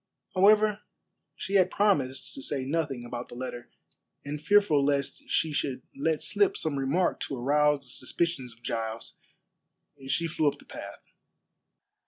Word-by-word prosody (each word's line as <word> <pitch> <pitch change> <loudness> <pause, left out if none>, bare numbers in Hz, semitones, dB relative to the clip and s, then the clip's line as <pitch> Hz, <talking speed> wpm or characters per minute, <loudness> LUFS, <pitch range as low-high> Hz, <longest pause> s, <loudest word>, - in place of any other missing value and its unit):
However, 210 +2 +5 0.5
she 195 - -6
had 185 -1 +4
promised 145 -12 +1
to - - -6
say 135 -1 -2
nothing 140 -4 -2
about 120 0 -6
the - - -10
letter, 120 -1 -6 0.6
and 145 +1 -4
fearful 200 -8 +4
lest 140 -1 0
she 160 -2 +1
should 130 -3 -2
let 155 +2 0
slip 205 -1 +2
some 145 -3 0
remark 150 +7 +1
to 135 - -4
arouse 145 +3 +3
the - - -12
suspicions 130 +1 -2
of 115 +1 -19
Giles, 115 -1 -4 0.9
she 165 +5 0
flew 155 -2 0
up 145 - +1
the - - -17
path. - - -9
145 Hz, 150 wpm, -28 LUFS, 130-170 Hz, 0.9 s, However